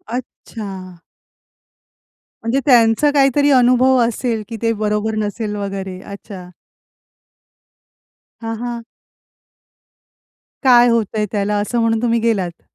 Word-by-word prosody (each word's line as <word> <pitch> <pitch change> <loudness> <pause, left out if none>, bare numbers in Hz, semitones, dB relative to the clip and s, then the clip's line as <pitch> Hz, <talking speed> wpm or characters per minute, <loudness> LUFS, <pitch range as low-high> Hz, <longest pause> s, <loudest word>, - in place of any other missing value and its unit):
अच्छा. 195 -7 -8 1.5
म्हणजे 230 +4 0
त्यांचा 240 +2 +4
काहीतरी 285 0 +3
अनुभव 255 0 +4
असेल 230 -1 -2
की 225 - -6
ते 230 -1 +1
बरोबर 210 +1 -1
नसेल 210 0 -3
वगैरे, 195 -2 -5
अच्छा. 200 -2 -10 1.9
हां, 225 0 -4
हां. 240 -1 -5 1.8
काय 245 -2 +6
होतंय 220 -2 0
त्याला, 205 0 -1
असं 235 +3 -2
म्हणून 225 -1 +1
तुम्ही 235 -1 +1
गेलात? 195 -7 -1
225 Hz, 100 wpm, -18 LUFS, 205-240 Hz, 1.9 s, काय